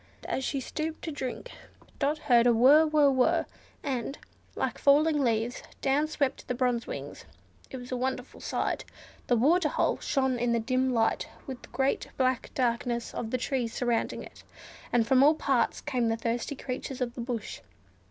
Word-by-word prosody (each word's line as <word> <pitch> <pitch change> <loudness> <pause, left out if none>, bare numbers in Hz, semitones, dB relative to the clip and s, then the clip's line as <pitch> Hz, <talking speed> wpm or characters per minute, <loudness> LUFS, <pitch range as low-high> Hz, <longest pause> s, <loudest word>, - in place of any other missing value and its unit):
As 265 - -2
she 275 - -1
stooped 315 +4 -4
to 320 - -3
drink, 285 - -5 0.5
Dot 290 +2 +1
heard 245 -5 +4
a - - +6
"whrr, 275 +7 +6
whrr, 290 -3 +4
whrr," 255 -1 +3 0.4
and, 270 0 -3 0.4
like - - -2
falling 295 +1 +4
leaves, 230 0 0 0.2
down 280 +3 +2
swept 285 -3 -2
the 250 - -1
Bronze 245 -2 0
Wings. - - -7 0.5
It 265 - -6
was 245 0 -9
a - - 0
wonderful 255 0 -3
sight. - - -2 0.4
The 245 - +3
water 305 +7 +3
hole - - 0
shone 265 -3 0
in 240 0 +1
the 235 - +2
dim 255 +3 +1
light, 225 -2 +1 0.2
with 260 -3 -7
the - - -13
great 265 +2 0
black 255 -2 +1
darkness 235 -1 -1
of 225 - -4
the 255 - 0
trees 250 -2 -2
surrounding 240 -2 -1
it, - - -13 0.5
and 235 -2 +3
from 260 +2 +4
all 300 +3 +6
parts 265 -6 +1
came 250 -5 0
the 225 0 0
thirsty 235 +5 -2
creatures 255 0 -5
of 245 -2 -2
the 240 - -6
bush. 235 -3 -4
255 Hz, 180 wpm, -28 LUFS, 240-280 Hz, 0.5 s, a